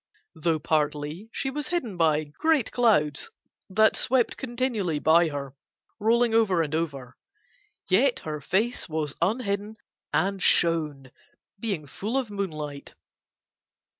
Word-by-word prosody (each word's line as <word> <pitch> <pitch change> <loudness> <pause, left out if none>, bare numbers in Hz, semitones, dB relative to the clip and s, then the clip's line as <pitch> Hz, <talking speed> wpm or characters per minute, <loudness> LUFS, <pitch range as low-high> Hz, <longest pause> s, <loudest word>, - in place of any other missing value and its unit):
Though 160 0 0
partly 150 +5 -1
she 270 - -2
was 295 +1 -4
hidden 275 - -2
by 155 -3 +2
great 270 - 0
clouds 155 - +2 0.4
that 215 +3 +4
swept 250 -2 +1
continually 235 - -1
by 165 +3 +4
her, 140 -2 -6 0.4
rolling 230 +2 +3
over 195 -7 +3
and 150 -1 -5
over, 140 -6 -3 0.7
yet 240 +8 +3
her 150 -1 -5
face 210 - -1
was 155 -2 -2
unhidden 205 +1 -1 0.4
and 195 0 0
shone, 150 -8 +1 0.5
being 195 -9 -3
full 210 - -3
of 250 -6 -2
moonlight. 155 -8 -5
185 Hz, 120 wpm, -26 LUFS, 150-225 Hz, 0.7 s, that